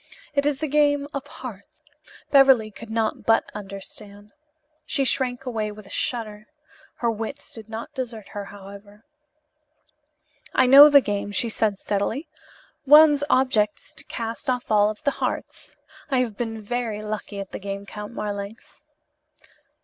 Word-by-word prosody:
It 280 0 +1
is 290 -2 0
the 310 - 0
game 290 0 +2
of 280 0 -5
hearts." 245 -8 -9 0.6
Beverly 265 -6 +6
could 225 +2 -11
not 220 -1 -1
but 225 0 +4
understand. 205 +1 -9 0.5
She 280 -3 0
shrank 255 -1 0
away 220 -4 -2
with 210 -1 -12
a 195 - -14
shudder. 215 -3 -3 0.5
Her 235 -1 0
wits 225 +5 -7
did 220 -1 -11
not 225 +7 -7
desert 235 -6 -6
her, 205 -1 -6
however. 205 +1 -13 1.5
"I 260 - +5
know 280 +4 +10
the 285 -1 +7
game," 205 -2 -3
she 230 +3 0
said 215 -2 0
steadily. 210 - -2 0.6
"One's 295 0 +7
object 225 -6 +2
is - - -18
to - - -9
cast 230 +4 -5
off 250 -2 -2
all 210 0 +4
the 285 - -1
hearts. - - -4 0.4
I 270 - +1
have 230 -5 -2
been 225 0 -4
very 225 -1 -3
lucky 210 -1 -5
at 195 -1 -7
the - - -6
game, 200 0 -6
Count 210 +2 -8
Marlanx." 205 -1 -7
225 Hz, 150 wpm, -24 LUFS, 205-260 Hz, 1.5 s, know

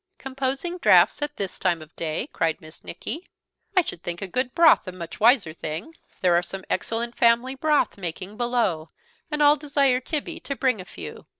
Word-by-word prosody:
"Composing 270 +6 -3
draughts - - +5
at 295 0 -2
this 195 -2 -4
time 175 -3 +1
of 155 0 -14
day!" 160 - -3
cried 165 -1 0
Miss 155 0 -15
Nicky; 315 - -5 0.5
"I 370 - +7
should 175 - -6
think 175 0 -4
a 195 - -4
little 185 - -13
good 255 0 -1
broth 335 - +6
a - - -3
much 170 -2 -8
wiser 220 - +4
thing. 160 - -5 0.3
There 180 -2 +4
are 170 - +4
some 190 +2 -6
excellent 235 +1 -2
family 235 +2 +3
broth 295 -5 +1
making 185 +3 -5
below, 230 -10 0 0.4
and 300 -1 +1
I'll 295 +1 +6
desire 280 -3 +2
Tibby 320 +4 -4
to 280 - -5
bring 255 -7 +1
a - - -11
few." 80 - -9
235 Hz, 195 wpm, -24 LUFS, 175-280 Hz, 0.5 s, I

